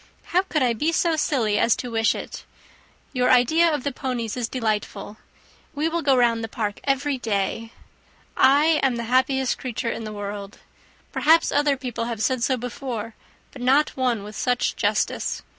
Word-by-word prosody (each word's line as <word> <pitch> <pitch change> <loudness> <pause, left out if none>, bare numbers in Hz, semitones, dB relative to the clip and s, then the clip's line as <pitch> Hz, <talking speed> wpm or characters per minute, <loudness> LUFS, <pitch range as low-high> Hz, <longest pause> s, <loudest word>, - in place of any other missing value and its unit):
How 360 - +5
could 310 -7 -1
I 245 -2 +2
be 300 +9 0
so 335 -1 +1
silly 240 -9 +1
as 230 - +3
to 245 - -6
wish 225 0 +2
it! - - -7 0.7
Your 250 -1 +1
idea 315 +7 +4
of 295 -4 -2
the 285 - -1
ponies 250 -4 -3
is 240 -2 -3
delightful. 215 -3 -3 0.6
We 300 +3 0
will 340 +1 -1
go 280 -3 +3
round 230 -2 +2
the - - -3
park 210 -2 -4
every 275 0 0
day. 225 +1 -2 0.6
I 295 +4 +4
am 265 -3 +2
the 235 - -3
happiest 260 +2 +1
creature 240 -2 -3
in 230 - -5
the 215 - -6
world. 205 0 -6 0.5
Perhaps 325 +2 +4
other 290 -1 +2
people 245 -3 -4
have 230 -2 -4
said 255 -2 0
so 260 +2 +1
before, 240 -2 -5 0.4
but 260 - -11
no 270 +4 +4
one 245 -5 -1
with 210 +1 -9
such 250 -1 0
justice. - - -1
250 Hz, 175 wpm, -23 LUFS, 225-280 Hz, 0.7 s, How